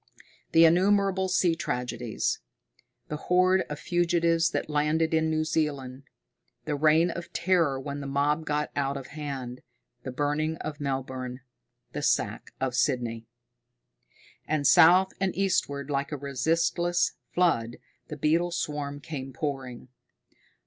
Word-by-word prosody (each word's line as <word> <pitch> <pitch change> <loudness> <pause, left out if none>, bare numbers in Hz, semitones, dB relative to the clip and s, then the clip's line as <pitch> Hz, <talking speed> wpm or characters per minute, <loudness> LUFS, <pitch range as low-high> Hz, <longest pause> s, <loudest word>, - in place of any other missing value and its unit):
The 165 0 +7
innumerable 190 +2 +3
sea 180 -2 +3
tragedies. 125 -6 -2 0.7
The 150 - -3
horde 185 +3 +3
of 150 - -4
fugitives 170 0 +2
that - - -2
landed 155 +2 +1
in 160 0 +2
New 155 0 +1
Zealand. 140 -4 -2 0.6
The 150 - -2
reign 155 +3 +4
of 170 +1 -7
terror 170 -6 +2
when 140 +1 -5
the 140 - -5
mob 145 +3 +1
got 150 -1 -2
out 140 -1 -1
of 135 - -9
hand, 135 -5 -6 0.4
the 130 - -6
burning 150 +4 -1
of 150 -1 -6
Melbourne, 130 -2 -4 0.5
the - - -3
sack - - 0
of 130 -1 -1
Sydney. 120 -3 -1 1.2
And 155 -2 0
south 185 +6 +6
and 195 -2 0
eastward, 145 -7 0
like 140 0 -1
a 150 - -3
resistless 165 +6 0 0.2
flood, 120 -10 +1 0.3
the 150 - -7
beetle 165 +4 +2
swarm 145 -4 -3
came 135 -3 -6
pouring. 130 -3 -5
150 Hz, 130 wpm, -27 LUFS, 135-165 Hz, 1.2 s, The